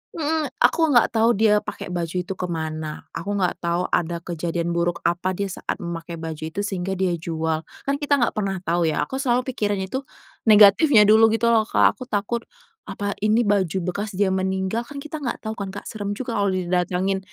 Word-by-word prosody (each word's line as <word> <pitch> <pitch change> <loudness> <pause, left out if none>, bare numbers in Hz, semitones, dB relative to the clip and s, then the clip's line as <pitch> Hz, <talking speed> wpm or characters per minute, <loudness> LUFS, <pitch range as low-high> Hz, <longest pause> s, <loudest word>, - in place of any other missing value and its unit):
mhm. 315 -1 0 0.2
Aku 320 +7 +4
nggak 250 -6 +4
tau 230 +1 +3
dia 210 0 +4
pakai 185 - -7
baju 170 -1 -3
itu 185 - -5
ke 180 - -2
mana, 155 -2 -4
aku 205 +1 -4
nggak 185 -3 0
tau 170 +1 0
ada 170 0 -1
kejadian 170 0 -2
buruk 170 0 -1
apa 180 +2 0
dia 200 +1 -3
saat - - -3
memakai 170 -2 -6
baju 160 -1 -6
itu 160 +6 -4
sehingga 190 -2 -2
dia 185 -1 0
jual. 160 -1 -2 0.2
Kan 280 +1 -1
kita 290 -1 +2
nggak 245 -4 +1
pernah 200 -3 -2
tau, 170 -1 +1
ya. 155 - 0
Aku 265 - -4
selalu 250 -2 +1
pikirin 205 -4 -1
itu 200 +8 -3 0.5
negatifnya 210 +4 +7
dulu 220 +2 +6
gitu 235 +1 +2
loh, 220 -2 +3
Kak. - - +3
Aku 255 - -7
takut, 225 +1 -2 0.4
apa 200 0 -3
ini 215 +3 +3
baju 195 -5 +1
bekas 200 +4 -3
dia 195 0 +2
meninggal, 190 +4 -1
kan 280 -1 -8
kita 305 0 -6
nggak 255 -5 -4
tau 220 - -3
kan, 200 -3 -5
Kak. 195 +1 -7
Serem 205 -2 -4
juga 250 +2 -5
kalau 200 - +2
di 185 - -1
didatangin. 185 +2 +1
200 Hz, 205 wpm, -23 LUFS, 175-225 Hz, 0.5 s, negatifnya